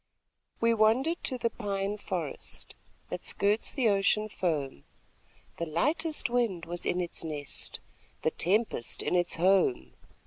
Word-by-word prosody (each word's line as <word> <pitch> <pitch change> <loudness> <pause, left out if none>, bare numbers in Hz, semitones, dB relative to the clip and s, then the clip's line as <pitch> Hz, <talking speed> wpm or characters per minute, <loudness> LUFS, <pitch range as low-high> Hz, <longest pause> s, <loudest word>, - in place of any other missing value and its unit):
We 230 0 +4
wandered 235 +10 +3
to 255 - 0
the 230 -1 0
pine 200 -2 -2
forest, 175 -7 -3 0.4
That - - -4
skirts 205 +2 +1
the 255 -4 +3
ocean 210 +2 +2
foam. 150 - -2 0.7
The 170 - -2
lightest 300 - 0
wind 235 -8 0
was 175 +1 -5
in 180 - +1
its 175 -1 -3
nest, 150 -3 -6 0.4
The 160 - +2
tempest 195 - +1
in - - -1
its 175 0 +2
home. 165 - +3
195 Hz, 135 wpm, -30 LUFS, 170-230 Hz, 0.7 s, We